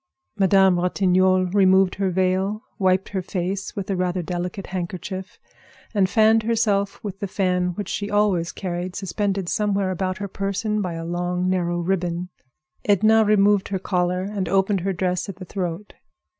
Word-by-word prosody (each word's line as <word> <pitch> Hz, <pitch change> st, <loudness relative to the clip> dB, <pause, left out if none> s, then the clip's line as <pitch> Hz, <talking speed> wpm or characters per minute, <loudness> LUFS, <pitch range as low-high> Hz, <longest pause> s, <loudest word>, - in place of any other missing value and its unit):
Madame 190 Hz, -2 st, +4 dB
Ratignolle 185 Hz, 0 st, +2 dB
removed 190 Hz, -1 st, +4 dB
her 195 Hz, -1 st, -1 dB
veil, 190 Hz, +3 st, 0 dB, 0.2 s
wiped 185 Hz, 0 st, +2 dB
her 190 Hz, -2 st, -2 dB
face 190 Hz, +2 st, -3 dB
with 200 Hz, -3 st, -4 dB
a -, -, 0 dB
rather 180 Hz, 0 st, -1 dB
delicate 180 Hz, +3 st, -4 dB
handkerchief, 185 Hz, +2 st, -5 dB, 0.6 s
and 195 Hz, -3 st, +2 dB
fanned 220 Hz, +1 st, +4 dB
herself 215 Hz, -3 st, 0 dB
with 195 Hz, -2 st, -6 dB
the 200 Hz, -, -3 dB
fan 180 Hz, -2 st, 0 dB
which 205 Hz, -, -4 dB
she 205 Hz, 0 st, -3 dB
always 205 Hz, -5 st, +1 dB
carried 180 Hz, -1 st, -4 dB
suspended 195 Hz, -1 st, -2 dB
somewhere 200 Hz, -1 st, 0 dB
about 185 Hz, +1 st, -2 dB
her 205 Hz, -, -4 dB
person 200 Hz, +2 st, -2 dB
by 180 Hz, -3 st, -3 dB
a 165 Hz, 0 st, -5 dB
long, 180 Hz, +1 st, -1 dB
narrow 175 Hz, -2 st, 0 dB
ribbon. 175 Hz, 0 st, -1 dB, 0.5 s
Edna 220 Hz, +2 st, +4 dB
removed 205 Hz, -1 st, +3 dB
her 195 Hz, -, -2 dB
collar 180 Hz, -1 st, 0 dB
and 195 Hz, -3 st, -3 dB
opened 195 Hz, +1 st, +2 dB
her 195 Hz, +2 st, -1 dB
dress 180 Hz, 0 st, -1 dB
at 195 Hz, -, -6 dB
the 185 Hz, 0 st, -9 dB
throat. 180 Hz, +1 st, -4 dB
190 Hz, 160 wpm, -23 LUFS, 180-200 Hz, 0.6 s, Madame